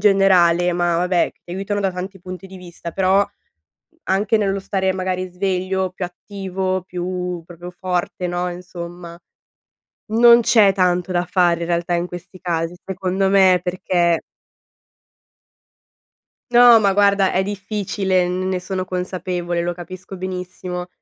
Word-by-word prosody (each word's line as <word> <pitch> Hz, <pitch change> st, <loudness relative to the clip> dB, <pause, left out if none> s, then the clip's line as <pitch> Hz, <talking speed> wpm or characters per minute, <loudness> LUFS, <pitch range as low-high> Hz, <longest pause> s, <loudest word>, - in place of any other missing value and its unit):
generale, 180 Hz, -4 st, +4 dB
ma 175 Hz, -1 st, +1 dB
vabbè, 180 Hz, 0 st, +1 dB
che 175 Hz, -, -9 dB
aiutano 195 Hz, +2 st, -2 dB
da 195 Hz, -2 st, 0 dB
tanti 190 Hz, +2 st, -6 dB
punti 185 Hz, +1 st, -9 dB
di 190 Hz, -, -11 dB
vista, 175 Hz, -1 st, -8 dB
però, 190 Hz, +3 st, +3 dB, 0.9 s
anche 200 Hz, +3 st, +2 dB
nello 195 Hz, -2 st, +1 dB
stare 190 Hz, -1 st, -1 dB
magari 185 Hz, 0 st, -2 dB
sveglio, 185 Hz, 0 st, -1 dB
più 185 Hz, -, -6 dB
attivo, 185 Hz, +1 st, -3 dB
più 180 Hz, -1 st, -4 dB
proprio 175 Hz, +1 st, -10 dB
forte, 180 Hz, 0 st, -3 dB
no, 175 Hz, 0 st, -2 dB
insomma. 175 Hz, -1 st, -9 dB, 0.9 s
Non 235 Hz, +1 st, +7 dB
c'è 210 Hz, -4 st, +5 dB
tanto 180 Hz, -1 st, +1 dB
da 175 Hz, 0 st, +1 dB
fare 175 Hz, -1 st, +2 dB
in 170 Hz, -, -2 dB
realtà 170 Hz, 0 st, 0 dB
in 170 Hz, +1 st, 0 dB
questi 180 Hz, +1 st, -10 dB
casi, 170 Hz, -1 st, -2 dB
secondo 190 Hz, 0 st, -1 dB
me, 190 Hz, -2 st, +5 dB
perché 175 Hz, -2 st, +1 dB, 2.3 s
No, 240 Hz, -1 st, +8 dB
ma 200 Hz, -2 st, +3 dB
guarda, 200 Hz, -1 st, +3 dB
è 190 Hz, -, +2 dB
difficile, 195 Hz, -2 st, -1 dB
n 185 Hz, +1 st, -2 dB
ne 185 Hz, -1 st, -1 dB
sono 185 Hz, 0 st, -3 dB
consapevole, 180 Hz, -1 st, -3 dB
lo 175 Hz, 0 st, -1 dB
capisco 185 Hz, +2 st, -9 dB
benissimo. 180 Hz, -1 st, -5 dB
185 Hz, 135 wpm, -20 LUFS, 175-195 Hz, 2.3 s, No